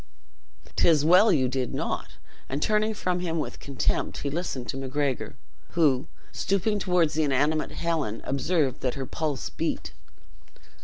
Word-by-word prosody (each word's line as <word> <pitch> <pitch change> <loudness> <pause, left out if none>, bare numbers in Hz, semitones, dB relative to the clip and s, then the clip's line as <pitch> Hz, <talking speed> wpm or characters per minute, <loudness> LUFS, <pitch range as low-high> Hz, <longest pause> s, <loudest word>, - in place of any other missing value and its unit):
"'Tis 155 -3 +4
well 185 +6 +7
you 135 -7 +3
did 130 -1 -2
not;" - - -3 0.3
and 140 +3 -1
turning 215 0 +2
from 185 -4 -1
him 170 -2 -2
with 150 - -3
contempt, 140 -2 -1
he 140 - -1
listened 145 -6 -3
to - - -3
Macgregor, 135 0 -2 0.4
who, 145 -6 +3 0.2
stooping 205 +2 0
toward 180 -5 +2
the 155 0 0
inanimate 150 +2 +1
Helen, 160 -10 -1
observed 140 -1 0
that 125 - -1
her 135 -1 -3
pulse 150 -2 -3
beat. - - -3
150 Hz, 145 wpm, -27 LUFS, 135-175 Hz, 0.4 s, well